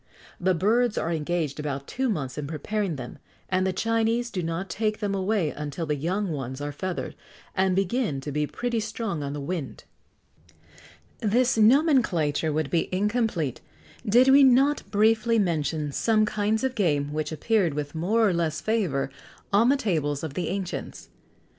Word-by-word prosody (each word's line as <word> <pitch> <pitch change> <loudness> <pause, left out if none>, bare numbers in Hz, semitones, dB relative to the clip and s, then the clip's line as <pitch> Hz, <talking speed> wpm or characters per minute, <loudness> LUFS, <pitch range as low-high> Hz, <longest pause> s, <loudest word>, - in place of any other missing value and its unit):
The 185 0 +2
birds 220 +6 +2
are 165 - -1
engaged 155 -2 -2
about 140 -2 -3
two 260 - -2
months 140 - -2
in 150 -1 -4
preparing 180 +4 -2
them, 125 -3 -8 0.3
and 185 0 +1
the - - +1
Chinese 230 +4 0
do 185 - -2
not 165 +3 -3
take 215 +4 -1
them 205 -2 -1
away 195 -4 0
until 150 +2 -5
the 150 - 0
young 185 +7 -1
ones 130 -3 -4
are 145 0 -4
feathered, 180 +5 -4 0.4
and 190 -1 +2
begin 195 - 0
to 145 +2 -5
be 150 +1 0
pretty 240 +5 -2
strong 215 -5 -3
on 140 0 -4
the 145 - -4
wing.[XX 150 +1 -5 1.4
104] 220 - -1
This 250 +4 +3
nomenclature 215 - +3
would 150 -1 -1
be 170 - +1
incomplete, 200 - 0 0.4
did 245 +4 +5
we 275 +1 +8
not 270 +3 +4
briefly 220 +2 +3
mention 155 -6 0
some 215 +7 +2
kinds 215 +2 0
of 265 -1 0
game 150 - 0
which 155 0 -2
appeared 175 0 +1
with 145 -1 -4
more 210 +8 +2
or 190 - +2
less 165 -3 -1
favour 175 -12 -1 0.4
on 225 +5 +5
the 280 - +4
tables 155 - -1
of 155 -4 -4
the 175 - -2
ancients. 190 -1 -5
185 Hz, 170 wpm, -26 LUFS, 150-220 Hz, 1.4 s, we